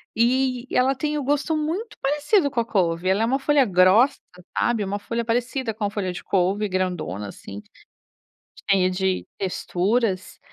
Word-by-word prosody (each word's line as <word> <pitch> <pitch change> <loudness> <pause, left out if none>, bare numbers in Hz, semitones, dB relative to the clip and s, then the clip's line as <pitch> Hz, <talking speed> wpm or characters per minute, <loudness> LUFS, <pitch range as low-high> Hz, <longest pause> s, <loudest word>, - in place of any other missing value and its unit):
E 255 +2 +1
ela 260 +2 +3
tem 300 +3 -2
o 290 - -2
gosto 290 +3 0
muito 345 +9 -3
parecido 295 +4 +2
com 255 - -1
a 230 - 0
couve 180 -5 0
ela 200 +4 +2
é - - +3
uma 265 +4 +1
folha 285 0 +3
grossa, 190 +7 +4 0.4
sabe? 230 -3 +1
Uma 200 +1 -3
folha 230 +3 -3
parecida 240 0 -1
com 215 - -6
a - - 0
folha 195 -3 -3
de - - -8
couve 195 +2 0
grandona, 175 - -2
assim, 100 +1 -9 1.1
cheia 190 -2 +4
de 190 0 -1
texturas, 195 +2 -1
225 Hz, 165 wpm, -23 LUFS, 185-270 Hz, 1.1 s, grossa